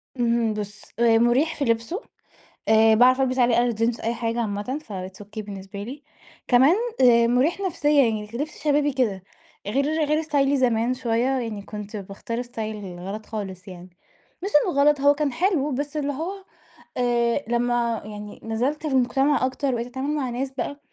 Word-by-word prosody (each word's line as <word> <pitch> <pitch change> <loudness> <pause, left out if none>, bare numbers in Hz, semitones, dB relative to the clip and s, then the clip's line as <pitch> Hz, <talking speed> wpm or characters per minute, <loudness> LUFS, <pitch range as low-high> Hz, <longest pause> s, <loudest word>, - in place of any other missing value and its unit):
اهم، 235 -2 +1
بُصّ 210 0 -6 0.2
آآ، 230 -1 +5
مريح 250 +8 +2
في 285 - -1
لِبسه، 230 - -1 0.7
آآ، 220 0 +6
باعرف 255 +3 +5
ألبس 255 0 0
عليه 240 -1 +4
أي 240 -1 +1
جينز 230 +2 0
أي 230 +1 -1
حاجة 230 0 -2
عامةً، 215 +6 -3
فit's 190 0 -8
okay 215 +2 -9
بالنسبة 200 0 -8
لي، 275 +6 -8 0.4
كمان 265 +8 +5 0.3
آآ، 235 -2 +6
مريح 260 +10 +2
نفسيًا 295 -6 +3
يعني 215 -2 -1
كلِبس 290 +8 -6
شبابي 290 -1 +2
كده، 210 -8 0 0.4
غير 275 +6 +1 0.2
غير 305 +1 +1
استايلي 285 -3 +1
زمان 240 -1 +2
شوية، 235 -1 0
يعني 220 -4 -4
كنت 210 +1 -8
باختار 205 +5 -5
style 215 -6 -6
غلط 200 +4 -6
خالص 195 -4 -6
يعني، 180 0 -10 0.5
مش 400 - -1 0.2
إنه 280 -6 +1
غلط 290 -1 +4
هو 285 0 +6
كان 290 -2 -1
حلو، 325 -3 +1
بس 290 +3 -3
اللي 285 -1 -1
هو 325 +7 -3 0.7
آآ، 240 +1 +1
لمّا 240 -1 0
يعني 210 -1 -9
نزلت 255 +8 -2
المجتمع 270 0 +2
أكتر 260 +1 -1
وبقيت 235 0 -2
أتعامل 270 +4 -3
مع 265 -4 -1
ناس 260 +3 -3
بقى، 285 +2 -4
240 Hz, 170 wpm, -24 LUFS, 220-280 Hz, 0.7 s, آآ